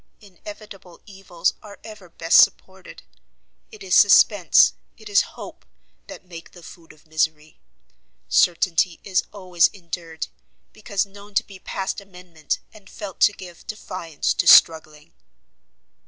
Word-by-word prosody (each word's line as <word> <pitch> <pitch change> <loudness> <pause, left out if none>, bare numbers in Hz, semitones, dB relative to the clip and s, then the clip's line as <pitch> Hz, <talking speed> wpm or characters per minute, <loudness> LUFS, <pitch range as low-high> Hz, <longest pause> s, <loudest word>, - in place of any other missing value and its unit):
Inevitable 200 -2 -14
evils 190 -4 -3
are 205 -2 -13
ever 210 -5 -13
best 165 0 +5
supported. 190 -1 -6 0.7
It 430 -2 -13
is 380 - -4
suspence, - - +5 0.2
it 215 -2 -13
is 200 - +4 0.2
hope - - -11 0.4
that - - -12
make 170 -2 -13
the 175 - -15
food 165 0 -15
of 155 -1 -23
misery; 155 -1 -3 0.7
certainty 175 0 +1
is 190 -3 0
always 180 -4 +1
endured, 170 -3 -8 0.5
because 200 -2 -3
known 200 +1 -16
to - - +2
be 195 -2 -14
past 195 +2 -5
amendment, 180 -5 -6 0.2
and 205 -3 -17
felt 195 -4 -9
to - - +5
give 180 -4 -14
defiance 185 -7 -4
to - - -2
struggling." 160 0 +4
185 Hz, 130 wpm, -22 LUFS, 165-200 Hz, 0.7 s, best